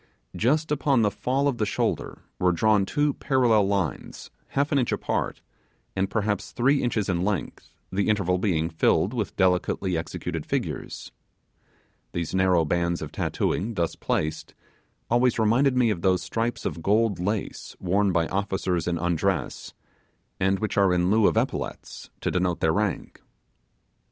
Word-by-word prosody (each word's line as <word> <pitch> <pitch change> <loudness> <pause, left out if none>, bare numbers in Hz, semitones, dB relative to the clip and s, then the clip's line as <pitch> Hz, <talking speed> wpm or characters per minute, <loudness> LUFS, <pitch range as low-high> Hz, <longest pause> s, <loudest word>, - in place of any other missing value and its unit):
Just 150 +7 +1
upon 140 -5 +2
the 105 - +2
fall 130 +7 0
of 135 -4 -1
the 105 - +2
shoulder - - -2 0.2
were 90 -1 +3
drawn 100 +3 +2
two 145 -1 +1
parallel 120 -8 +2
lines 95 -8 -3 0.2
half 140 +2 -1
an 140 - +3
inch 125 - 0
apart, - - -2 0.5
and 95 0 0
perhaps 105 -2 -1
three 135 +3 +2
inches 110 -5 0
in 90 -2 0
length, 100 -4 -3 0.2
the 100 +2 0
interval 95 -4 +1
being 85 -5 +1
filled 85 +6 +1
with 110 -5 -3
delicately 90 0 +1
executed 80 0 -4
figures. - - -4 1.0
These 85 -2 -3
narrow 95 -3 +3
bands 85 +2 0
of - - -7
tattooing, 110 +4 -1
thus 85 -3 -1
placed, 75 0 -2 0.5
always 120 0 +2
reminded 125 +4 +3
me 120 -3 +4
of 90 -5 -3
those 90 -1 +2
stripes 115 +5 -2
of 85 - -3
gold 105 0 +2
lace 100 +3 -3
worn 95 +2 +1
by 85 -2 +2
officers 95 -3 -1
in 85 -1 0
undress, 85 -1 -1 0.6
and 95 +1 +2
which 110 +1 -3
are 95 -3 +4
in 90 +1 +2
lieu 110 -1 +5
of - - +1
epaulettes - - -3
to - - -1
denote 90 -1 0
their 80 -1 +2
rank. 105 -1 -2
100 Hz, 155 wpm, -25 LUFS, 90-115 Hz, 1.0 s, lieu